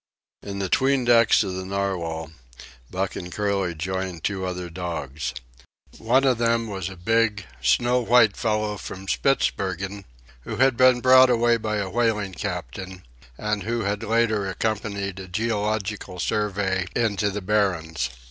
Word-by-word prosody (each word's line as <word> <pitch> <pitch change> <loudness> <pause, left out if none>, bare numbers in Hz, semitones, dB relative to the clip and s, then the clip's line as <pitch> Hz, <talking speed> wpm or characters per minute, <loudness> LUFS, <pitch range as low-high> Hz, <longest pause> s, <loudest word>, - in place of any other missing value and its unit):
In 100 -1 -6
the 100 -1 -1
'tween 135 +5 +2
decks 115 -2 +5
of 95 -2 -4
the 95 0 -4
Narwhal, 90 -5 -3 0.6
Buck 95 +1 -2
and 90 0 -6
Curly 100 -2 -1
joined 95 +1 -4
two 95 -2 -1
other 90 -1 -4
dogs. 80 -5 -4 0.7
One 125 +4 +3
of 130 -4 +2
them 115 0 +2
was 95 -4 -4
a 95 - -9
big, 105 +1 +1 0.2
snow 120 - +3
white 115 -3 +4
fellow 105 -2 -1
from 95 0 -8
Spitzbergen 95 -6 0 0.4
who - - -6
had 130 0 +3
been 130 0 +5
brought 130 0 +7
away 120 -1 +3
by 110 -1 -2
a 100 -2 -2
whaling 110 -4 0
captain, 95 +3 -5 0.3
and 105 -1 -1
who 115 +4 -2
had 100 +1 -1
later 110 -3 +1
accompanied 100 -2 -2
a 95 - -8
Geological 105 -1 -2
Survey 95 -2 -1
into 105 -3 +1
the 100 +1 -4
Barrens. 85 -9 0
100 Hz, 150 wpm, -24 LUFS, 95-115 Hz, 0.7 s, brought